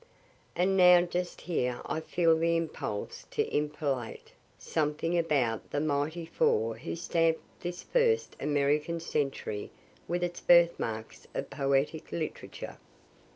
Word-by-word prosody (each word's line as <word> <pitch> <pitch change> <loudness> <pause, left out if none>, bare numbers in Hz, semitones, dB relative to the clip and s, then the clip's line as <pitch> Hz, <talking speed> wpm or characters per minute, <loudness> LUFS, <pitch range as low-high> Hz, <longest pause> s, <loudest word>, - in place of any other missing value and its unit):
And 190 +2 +2
now 180 -1 +8
just 175 0 -3
here 125 -8 -1
I - - -2
feel 165 0 +3
the 165 +1 +2
impulse 155 -10 -4
to - - 0
interpolate 145 -5 -2 0.3
something 155 +2 -1
about 140 -10 +1
the 145 - -1
mighty 155 +3 -1
four 115 -8 +1
who 130 - -4
stamp 165 -1 +1 0.2
this 175 0 -5
first 475 -2 +2
American 150 +3 +1
century 135 -9 -2 0.4
with 175 +1 -1
its 175 0 -2
birthmarks 170 -11 +2
of - - -3
poetic 140 +2 0
literature. 160 -2 -5
160 Hz, 120 wpm, -30 LUFS, 140-170 Hz, 0.4 s, now